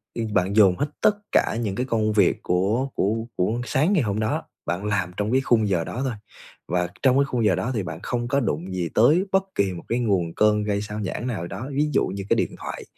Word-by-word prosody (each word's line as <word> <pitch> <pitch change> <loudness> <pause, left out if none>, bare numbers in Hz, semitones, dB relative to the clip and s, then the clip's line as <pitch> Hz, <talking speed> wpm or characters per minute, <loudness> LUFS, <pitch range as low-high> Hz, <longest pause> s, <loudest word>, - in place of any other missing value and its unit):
ư, 115 - -2
bạn 95 0 +1
dồn 100 -4 +6
hết 145 - 0
tất 210 - +4 0.2
cả - - +2
những 100 -4 -2
cái 125 +5 -1
công 110 -3 0
việc 100 -4 +2
của 100 +9 +1
của 100 +3 +1 0.2
của 110 +6 0
sáng 150 +10 +2
ngày 170 -9 +3
hôm 105 -1 -1
đó, 110 0 -1 0.2
bạn 90 +4 -2
làm 95 -3 0
trong 105 +1 -1
cái 130 +1 +3
khung 115 -5 +2
giờ 90 -4 +1
đó 120 - -5
thôi. 130 - -1 0.5
Và 90 0 0
trong 130 -1 +4
cái 140 - +4
khung 125 -4 -1
giờ 95 -4 +4
đó 125 - -2
thì 105 - -1
bạn 85 -2 -6
không 120 -1 -2
có 140 +3 +1
đụng 95 - -2
gì 90 -2 -2
tới 155 - +5
bất 190 0 +3
kỳ 100 -2 +1
một 85 - -8
cái 120 +2 0
nguồn 95 -8 0
cơn 105 0 +3
gây 100 -1 -1
xao 105 +1 -5
nhãng 105 +5 -3
nào 110 -9 -3
đó, 130 - -6
ví 150 +2 +1
dụ - - +3
như 95 +1 -5
cái - - +4
điện - - -1
thoại. - - -6
105 Hz, 255 wpm, -24 LUFS, 95-125 Hz, 0.5 s, dồn